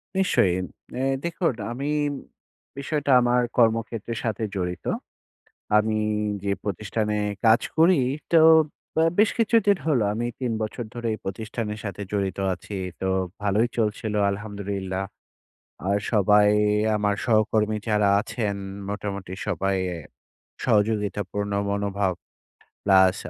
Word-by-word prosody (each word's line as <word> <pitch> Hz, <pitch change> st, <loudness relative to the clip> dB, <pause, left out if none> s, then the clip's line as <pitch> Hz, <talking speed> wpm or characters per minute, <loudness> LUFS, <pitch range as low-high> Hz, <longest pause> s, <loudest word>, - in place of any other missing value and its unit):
নিশ্চয়ই। 140 Hz, -, +3 dB, 0.4 s
এ্যা 130 Hz, -, 0 dB, 0.2 s
দেখুন 170 Hz, -4 st, 0 dB, 0.2 s
আমি 140 Hz, +5 st, -3 dB, 0.9 s
বিষয়টা 145 Hz, 0 st, -1 dB
আমার 125 Hz, 0 st, +3 dB, 0.2 s
কর্মক্ষেত্রের 115 Hz, -1 st, +1 dB
সাথে 110 Hz, -1 st, -2 dB
জড়িত। 90 Hz, -2 st, -3 dB, 0.9 s
আমি 110 Hz, 0 st, +2 dB, 0.5 s
যে 100 Hz, -, +1 dB
প্রতিষ্ঠানে 105 Hz, +2 st, -2 dB, 0.3 s
কাজ 110 Hz, +2 st, +6 dB, 0.2 s
করি, 165 Hz, -1 st, +5 dB, 0.3 s
তো 165 Hz, -, +7 dB, 0.5 s
ব্য -, -, -2 dB, 0.2 s
বেশ 210 Hz, +1 st, +5 dB
কিছুদিন 215 Hz, -3 st, +4 dB
হলো; 140 Hz, -8 st, +3 dB
আমি 120 Hz, +2 st, -2 dB
৩ 125 Hz, -2 st, -1 dB
বছর 110 Hz, +2 st, -4 dB
ধরে 120 Hz, -1 st, -4 dB
এই -, -, -7 dB
প্রতিষ্ঠানের 105 Hz, +2 st, -4 dB
সাথে 100 Hz, 0 st, -5 dB
জড়িত 100 Hz, -2 st, -1 dB, 0.2 s
আছি। 100 Hz, +2 st, -8 dB, 0.2 s
তো 95 Hz, -, -1 dB, 0.3 s
ভালোই 105 Hz, +4 st, +2 dB
চলছিলো 105 Hz, -1 st, 0 dB
আলহামদুলিল্লাহ। 100 Hz, -2 st, -4 dB, 0.8 s
আর 100 Hz, +1 st, +2 dB
সবাই 105 Hz, 0 st, +5 dB, 0.5 s
আমার 105 Hz, -1 st, +1 dB
সহকর্মী 110 Hz, -2 st, +2 dB
যারা 105 Hz, -1 st, +3 dB
আছেন 105 Hz, -3 st, -3 dB, 0.3 s
মোটামুটি 100 Hz, -2 st, -4 dB
সবাই 95 Hz, -1 st, 0 dB, 0.9 s
সহযোগিতাপূর্ণ 105 Hz, -3 st, 0 dB, 0.2 s
মনোভাব 100 Hz, -2 st, 0 dB, 0.7 s
প্লাস 95 Hz, -1 st, +5 dB
105 Hz, 110 wpm, -25 LUFS, 100-120 Hz, 0.9 s, তো